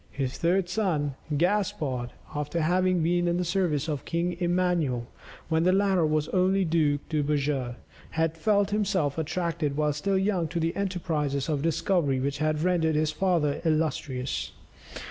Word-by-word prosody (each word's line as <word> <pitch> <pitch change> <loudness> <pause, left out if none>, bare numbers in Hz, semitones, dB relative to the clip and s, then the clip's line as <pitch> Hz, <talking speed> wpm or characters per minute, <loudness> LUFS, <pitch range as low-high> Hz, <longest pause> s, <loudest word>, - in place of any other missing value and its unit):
His 135 -2 -3
third 180 +2 +2
son, 175 -8 0 0.2
Gaspard, 155 -9 0 0.2
after 150 +3 -2
having 180 +1 +2
been 175 +1 +2
in 175 0 +1
the 180 - -1
service 170 -5 0
of 150 -3 -3
King 170 +1 -1
Emmanuel, 175 -8 +1 0.4
when 160 -1 +1
the 180 +2 +4
latter 190 -4 +3
was 155 -1 0
only 190 +1 +2
Duke 155 -3 +1
de 155 -2 0
Beja 140 -4 -1 0.3
had 160 0 0
felt 205 +3 +2
himself 190 -8 0
attracted 160 -2 -2
while 150 -1 +2
still 190 +7 0
young 190 -3 +1
to 170 +2 -3
the 165 +1 -1
enterprises 160 -8 -1
of 145 -3 0
discovery 160 -3 +1
which 140 +1 -2
had 155 0 0
rendered 170 -3 +2
his 155 0 +1
father 170 -7 +1
illustrious. 150 -5 -1
165 Hz, 155 wpm, -27 LUFS, 150-180 Hz, 0.4 s, the